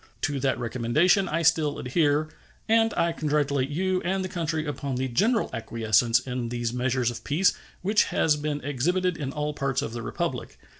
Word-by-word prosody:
To 145 -1 -1
that 130 -3 0
recommendation 130 - +2
I 165 +2 -1
still 155 -2 +2
adhere, 145 +2 +1 0.4
and 225 0 +4
I 170 0 +2
congratulate 145 -4 0
you 185 +4 0
and 190 +2 -1
the - - -5
country 160 -2 -2
upon 140 -2 -3
the 130 +1 -1
general 215 - +1
acquiescence 115 0 +2
in 125 -2 -4
these 120 -1 -2
measures 125 -1 0
of 115 -1 -9
peace 170 +6 +2 0.3
which 210 +3 +3
has 150 - +2
been 145 0 -3
exhibited 175 +7 0
in 140 -4 -4
all 150 +1 -2
parts 140 -1 -1
of 115 - -5
the 120 - -4
Republic. - - -4
145 Hz, 180 wpm, -26 LUFS, 125-170 Hz, 0.4 s, and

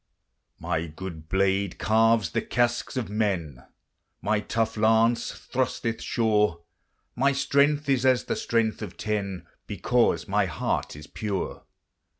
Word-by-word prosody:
My 80 +1 -2
good 80 -1 -8
blade 95 0 +1
carves 110 -4 +3
the - - 0
casques 120 +1 0
of 125 - -1
men, 95 - -2 0.6
My 105 0 +1
tough 115 +1 -1
lance 115 +2 +3
thrusteth 120 -3 -2
sure, 105 -7 +1 0.5
My 140 +3 +3
strength 140 +2 +2
is 135 -2 +2
as 130 -1 +4
the - - -2
strength 115 -2 0
of 100 -4 -7
ten, 100 -3 -3 0.2
Because - - +1
my - - +2
heart - - -2
is 75 +1 -10
pure. 100 +1 -4
110 Hz, 130 wpm, -26 LUFS, 95-120 Hz, 0.6 s, as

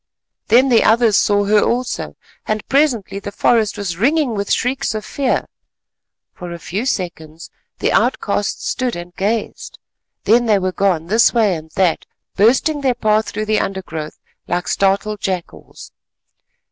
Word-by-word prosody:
Then 250 +5 +5
the 235 -3 +4
others 225 -1 +4
saw 205 0 +2
her 210 +1 +4
also, 245 +1 -2 0.3
and 215 -1 -2
presently 260 -9 +1
the 200 - -7
forest 220 0 +1
was 185 -5 -4
ringing 280 - +1
with 200 -1 -3
shrieks 255 -1 0
of 215 - -4
fear. 275 -2 -1 0.9
For 175 -2 -8
a 170 - -6
few 200 +8 -4
seconds 165 -7 -5 0.3
the - - 0
outcasts - - 0
stood 255 -2 -1
and 175 +1 -9
gazed, 210 +3 -3 0.5
then 235 +2 +3
they 210 -2 +4
were 185 -1 -1
gone 180 -4 0
this 220 +7 +3
way 215 -5 +3
and 160 -1 -7
that, 180 -4 +1 0.3
bursting 265 +8 +2
their 260 -3 +1
path 215 -2 +1
through 215 +1 -4
the 215 0 +1
undergrowth 165 -6 -5 0.3
like 175 +1 -2
startled 200 +2 0
jackals. 185 -3 -6
210 Hz, 150 wpm, -18 LUFS, 185-235 Hz, 0.9 s, Then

